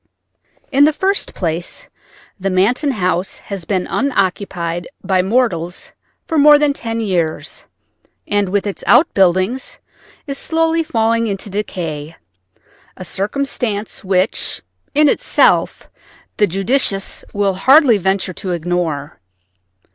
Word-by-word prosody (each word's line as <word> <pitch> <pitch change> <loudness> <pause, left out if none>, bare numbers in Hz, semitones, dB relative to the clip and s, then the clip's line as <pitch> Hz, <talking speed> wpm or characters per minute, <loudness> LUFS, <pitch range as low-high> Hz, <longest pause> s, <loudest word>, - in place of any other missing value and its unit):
In 280 +1 +5
the 305 - +3
first 390 +5 -1
place 170 - -3 0.5
the 195 +1 -1
Manton 215 +10 +2
house 185 -3 -1
has 195 -4 -7
been 185 -1 -1
unoccupied 185 -8 -1 0.2
by 190 -2 +2
mortals 185 -5 -1 0.3
for 320 - 0
more 295 +1 +8
than 290 -1 +2
ten 230 -3 -4
years, 175 -7 -2 0.6
and 205 -2 +1
with 200 +2 0
its 200 - -5
outbuildings 195 - +3 0.5
is 275 -2 -3
slowly 325 0 +1
falling 230 -5 +1
into 200 0 -4
decay—a 165 -6 -4 0.9
circumstance 215 +1 -3
which 190 +1 -1 0.3
in 300 +1 +5
itself - - +2 0.5
the 205 - +4
judicious 195 +1 -1
will 200 -1 0
hardly 260 - +5
venture 190 0 0
to 185 +1 -4
ignore. 165 -4 -2
200 Hz, 110 wpm, -17 LUFS, 180-255 Hz, 0.9 s, more